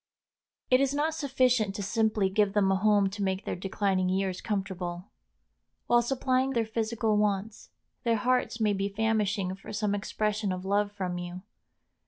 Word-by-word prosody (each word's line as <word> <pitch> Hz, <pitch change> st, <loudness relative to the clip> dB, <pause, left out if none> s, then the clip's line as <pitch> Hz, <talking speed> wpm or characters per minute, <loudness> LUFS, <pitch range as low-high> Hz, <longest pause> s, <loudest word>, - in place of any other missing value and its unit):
It 255 Hz, +1 st, +6 dB
is 275 Hz, 0 st, +1 dB
not 305 Hz, +2 st, +1 dB
sufficient 255 Hz, -8 st, +1 dB
to 205 Hz, -, -3 dB
simply 215 Hz, -1 st, +1 dB
give 195 Hz, +1 st, +1 dB
them 200 Hz, -2 st, +3 dB
a -, -, +3 dB
home 205 Hz, 0 st, +3 dB
to 205 Hz, +1 st, -6 dB
make 190 Hz, +1 st, -1 dB
their -, -, -2 dB
declining 190 Hz, 0 st, 0 dB
years 190 Hz, -1 st, -1 dB
comfortable. 190 Hz, -3 st, -4 dB, 0.7 s
While 240 Hz, 0 st, +4 dB
supplying 260 Hz, +1 st, 0 dB
their 230 Hz, -2 st, +1 dB
physical 220 Hz, 0 st, 0 dB
wants, 210 Hz, 0 st, -1 dB, 0.3 s
their 230 Hz, -2 st, +2 dB
hearts 250 Hz, +1 st, 0 dB
may 215 Hz, -2 st, +2 dB
be 195 Hz, 0 st, -1 dB
famishing 205 Hz, -2 st, 0 dB
for 195 Hz, -, -10 dB
some 210 Hz, -1 st, -1 dB
expression 210 Hz, 0 st, -1 dB
of 185 Hz, 0 st, -4 dB
love 205 Hz, +1 st, +1 dB
from 185 Hz, -3 st, -3 dB
you. 175 Hz, +1 st, -7 dB
205 Hz, 165 wpm, -28 LUFS, 195-225 Hz, 0.7 s, It